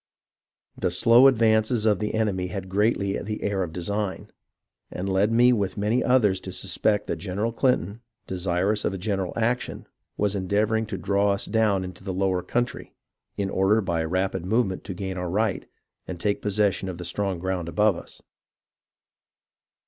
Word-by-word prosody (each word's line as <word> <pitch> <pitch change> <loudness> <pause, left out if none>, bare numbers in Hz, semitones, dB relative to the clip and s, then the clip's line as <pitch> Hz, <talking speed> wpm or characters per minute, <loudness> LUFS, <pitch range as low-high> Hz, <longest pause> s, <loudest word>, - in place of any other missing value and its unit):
The 90 - -1
slow 115 +8 +6
advances 110 -2 +3
of 105 -2 +3
the 105 0 -2
enemy 100 -5 0
had 95 0 -5
greatly 100 0 +1
the 105 +1 -5
air 100 -1 0
of 90 -3 -3
design, 100 +3 -3 0.6
and 95 - -5
led 95 +3 +2
me 120 +2 +5
with 100 -5 -1
many 110 +5 +1
others 110 -7 +3
to - - -8
suspect 105 -2 0
that 85 - -3
General 100 +6 -2
Clinton, 115 -4 0 0.2
desirous 95 +3 -1
of - - 0
a - - -4
general 95 -1 -2
action, 120 +2 -1 0.3
was 105 -1 +1
endeavouring 105 +3 0
to 100 -3 -4
draw 100 +3 +1
us 100 - -3
down 105 -4 +1
into 90 0 -9
the 95 -2 -4
lower 95 -1 +1
country, 120 +6 -3 0.4
in 100 -1 -1
order 95 +3 +3
by 85 -5 -1
a 80 - -2
rapid 95 0 -1
movement 95 -1 0
to 95 - -5
gain 95 0 -4
our 90 -1 -3
right, 105 +2 -1 0.4
and 90 -2 -6
take 100 +3 0
possession 100 -2 0
of 90 - -6
the 90 - -7
strong 100 0 -2
ground 90 -1 -3
above 105 +1 +3
us. - - -11
100 Hz, 170 wpm, -25 LUFS, 95-110 Hz, 0.6 s, slow